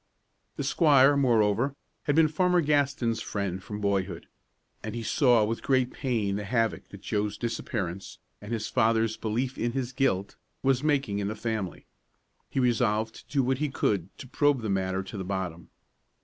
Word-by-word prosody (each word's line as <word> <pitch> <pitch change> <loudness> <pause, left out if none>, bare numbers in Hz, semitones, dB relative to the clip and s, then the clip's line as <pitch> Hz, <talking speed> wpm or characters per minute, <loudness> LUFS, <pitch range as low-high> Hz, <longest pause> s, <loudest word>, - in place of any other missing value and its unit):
The - - -3
squire, 145 -4 +5
moreover, 120 0 +2 0.3
had 145 - +1
been 160 -1 +6
Farmer 180 +3 +2
Gaston's 140 -6 +1
friend 95 -2 -3
from 105 +2 -6
boyhood, 95 -4 -1 0.6
and - - -5
he 115 - -4
saw 120 -2 +4
with 115 +2 -3
great 130 -2 +2
pain 110 -7 -1
the 105 - -4
havoc 115 +1 -1
which 100 - -11
Joe's 105 -1 -1
disappearance, 100 -6 -4 0.2
and 105 +2 -8
his 110 -2 -2
father's 115 -2 +2
belief 120 +4 -2
in 120 0 -1
his 130 -1 -3
guilt, 100 -9 0 0.3
was 135 0 +2
making 140 -9 +1
in 100 - -1
the 110 - -3
family. 110 -5 -4 0.6
He - - -1
resolved 115 -3 +1
to - - -15
do 140 -2 +2
what 130 +1 0
he 150 -1 0
could 100 -8 0
to - - -9
probe 145 0 +2
the 110 - -2
matter 95 0 -1
to 95 +3 -8
the - - -3
bottom. 90 -3 -4
115 Hz, 175 wpm, -28 LUFS, 100-135 Hz, 0.6 s, been